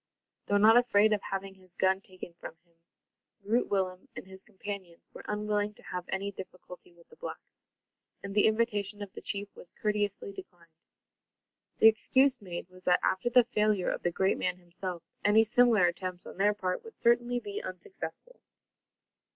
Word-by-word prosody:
Though 205 - +3
not 220 +3 +7
afraid 220 -3 +4
of 205 - 0
having 195 0 -4
his 185 -2 -17
gun 190 0 +2
taken 185 -2 -10
from 170 - -10
him, 170 - -34 0.7
Groot 225 +5 +1
Willem 185 -2 -1
and - - -7
his 190 0 -12
companions 195 -4 -8
were - - -10
unwilling 210 0 -1
to - - -15
have 180 -1 -5
any 195 +1 -2
difficulty 180 -2 -11
with 170 -1 -22
the - - -18
blacks; - - -10 0.6
and 200 0 -5
the 205 +1 +5
invitation 210 -2 0
of 195 - -10
the - - -9
chief 200 0 -3
was 175 - -12
courteously 205 -2 -1
declined. 170 -4 -14 0.9
The 220 - +7
excuse 260 +4 +3
made 175 -3 -6
was 185 0 -17
that, 180 - +4
after 190 +6 +1
the 245 0 +6
failure 210 -5 +1
of - - -4
the - - +1
great 190 +3 +1
man - - -1
himself, 175 0 -7 0.2
any 210 +2 +6
similar 225 -3 +4
attempts 180 +1 -3
on - - -10
their 205 +2 +3
part 185 -3 -2
would 455 - -13
certainly 240 +1 +3
be 410 - -5
unsuccessful. - - -8
200 Hz, 175 wpm, -30 LUFS, 185-220 Hz, 0.9 s, not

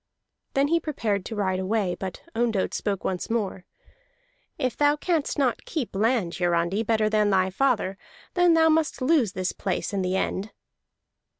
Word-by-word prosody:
Then 275 +1 +3
he 335 +1 +3
prepared 215 - -2
to 225 - -5
ride 190 -3 0
away, 190 -1 0
but 190 0 -6
Ondott 225 -4 0
spoke 200 -3 -2
once 185 +3 -2
more. 205 -5 -2 0.9
"If 255 -5 -1
thou 290 0 +3
canst 315 -1 -1
not 265 -5 +1
keep 295 - -4
land, 215 -4 +1
Hiarandi, 175 +3 +1
better 220 -1 +1
than 215 -1 +2
thy 190 -1 +2
father, 205 -4 0 0.3
then 355 -2 +4 0.2
must 315 -2 0
thou 255 - -2
lose 270 - +3
this 185 0 -1
place 195 +1 -3
in 195 - 0
the 185 0 0
end." 190 +2 -1
215 Hz, 165 wpm, -25 LUFS, 190-270 Hz, 0.9 s, then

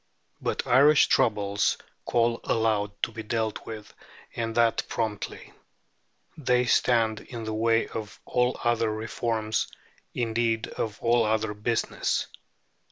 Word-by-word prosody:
But - - -2
Irish 145 +4 +6
troubles 100 -2 +2 0.3
call 115 -1 +2
aloud 110 -2 +1
to - - +1
be 110 0 -6
dealt 110 0 -2
with, 110 -2 -8 0.4
and 115 -1 -2
that 115 -1 +3
promptly. 110 -3 -4 0.8
They 125 -4 +2
stand 115 -3 +2
in 115 -2 -8
the 110 0 -3
way 115 +1 +2
of 110 -2 -7
all 125 0 +1
other 115 -2 +2
reforms, 110 0 -1 0.5
indeed 115 -1 0
of 105 -2 -4
all 120 0 +4
other 110 0 0
business. 110 +3 -1
115 Hz, 120 wpm, -27 LUFS, 110-120 Hz, 0.8 s, Irish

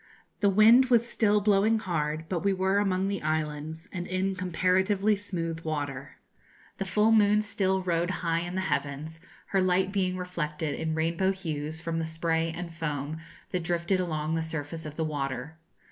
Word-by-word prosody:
The 200 - +4
wind 220 +6 +7
was 235 -2 +4
still 210 -3 +2
blowing 205 +2 +3
hard, 160 -6 -2
but 180 -1 -1
we 200 -1 +3
were 190 +1 +2
among 195 -1 +1
the 200 -1 -2
islands, 155 +2 -3
and 175 -2 -4
in 185 +1 0
comparatively 190 +3 +2
smooth 170 -5 -4
water. 145 -4 -4 0.6
The 195 - -1
full 210 +4 +3
moon 210 -1 +5
still 190 -2 0
rode 175 -1 0 0.2
high 165 0 +2
in 175 +1 -4
the 190 - 0
heavens, 145 0 -3 0.3
her 195 - +2
light 185 +1 +2
being 185 -2 0
reflected 160 -4 -3
in 160 -1 -2
rainbow 170 +4 +1
hues 160 -4 -4
from 165 0 -2
the - - -1
spray 165 0 0
and 170 0 -6
foam 150 -1 -3 0.3
that 180 - -1
drifted 170 +3 0
along 155 -3 -1
the 165 - 0
surface 160 0 -5
of 150 - -8
the 160 - -1
water. 145 0 -4
170 Hz, 175 wpm, -28 LUFS, 160-190 Hz, 0.6 s, wind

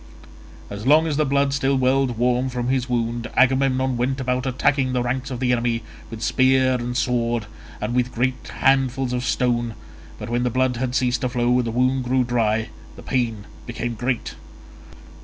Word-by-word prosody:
As 105 +4 -5
long 155 +3 +6
as 155 -3 -1
the 155 -2 +2
blood 140 0 +1
still 140 -1 +1
welled 130 -1 +1
warm 125 +2 +1
from 125 -1 -3
his 130 -1 0
wound 115 -1 -2
Agamemnon 130 0 +2
went 130 +3 -1
about 125 0 -1
attacking 130 0 +1
the 125 -1 0
ranks 125 +2 -2
of 125 -3 -5
the 125 -1 +1
enemy 120 -1 0 0.3
with 115 -1 -7
spear 130 +1 +3
and 125 0 -2
sword 120 -3 0 0.3
and 105 +3 -3
with 125 0 0
great 125 +2 -2
handfuls 135 -1 +1
of 125 0 -1
stone, 120 -1 0 0.4
but 105 - -7
when 120 +1 -1
the 125 - +1
blood 130 0 0
had 125 0 -2
ceased 125 0 +1
to 125 - 0
flow 120 0 +1
and 125 - 0
the - - -2
wound 130 +3 +1
grew 130 +1 +2
dry, 110 -2 0 0.3
the - - -12
pain 115 -5 -1 0.2
became 120 0 -3
great. 120 +2 -2
125 Hz, 185 wpm, -22 LUFS, 120-130 Hz, 0.4 s, long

